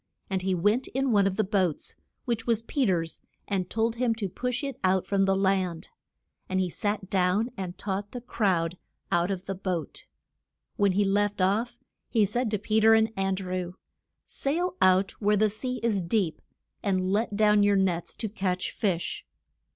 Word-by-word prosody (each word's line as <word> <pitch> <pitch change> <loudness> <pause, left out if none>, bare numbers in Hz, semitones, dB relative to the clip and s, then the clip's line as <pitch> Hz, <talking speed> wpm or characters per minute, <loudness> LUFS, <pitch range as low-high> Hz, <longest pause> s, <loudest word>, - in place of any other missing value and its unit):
And 190 -1 0
he 190 0 0
went 210 +8 +2
in 265 0 0
one 200 -2 +4
of 190 - -1
the 215 - +2
boats, 190 -5 0 0.3
which 235 -2 -2
was 230 -1 +1
Pe 265 +1 0
ter's 165 -3 -1 0.3
and 190 -3 -1
told 225 +1 0
him 240 -2 +1
to 215 -3 -2
push 250 +6 -2
it 275 -3 -4
out 185 0 +2
from 195 -1 +2
the 195 0 +2
land. 190 -3 0 0.6
And 185 - 0
he 185 -2 0
sat 205 0 -2
down, 195 +5 +2
and 185 -2 -5
taught 200 0 -3
the 250 - -5
crowd 185 -8 0 0.3
out 175 +1 +2
of 190 -1 -3
the 195 - -3
boat. 185 -3 -4 0.7
When 200 -4 +2
he 205 +2 +2
left 205 +1 +1
off, 215 +6 +1 0.3
he 220 -3 +3
said 240 +4 -1
to 210 - 0
Pe 215 +2 +1
ter 225 +1 +6
and 220 0 +2
An 195 0 0
drew, 185 -1 -4 0.5
Sail 345 +6 -2
out 185 +1 +4
where 210 0 +3
the 215 0 +3
sea 250 +4 -4
is 215 -5 +1
deep, 175 -1 0 0.4
and 185 -2 0
let 215 0 0
down 210 0 +4
your 205 0 +4
nets 180 -3 0
to 220 - -3
catch 190 -3 -2
fish. 180 -5 -2
200 Hz, 185 wpm, -27 LUFS, 185-220 Hz, 0.7 s, ter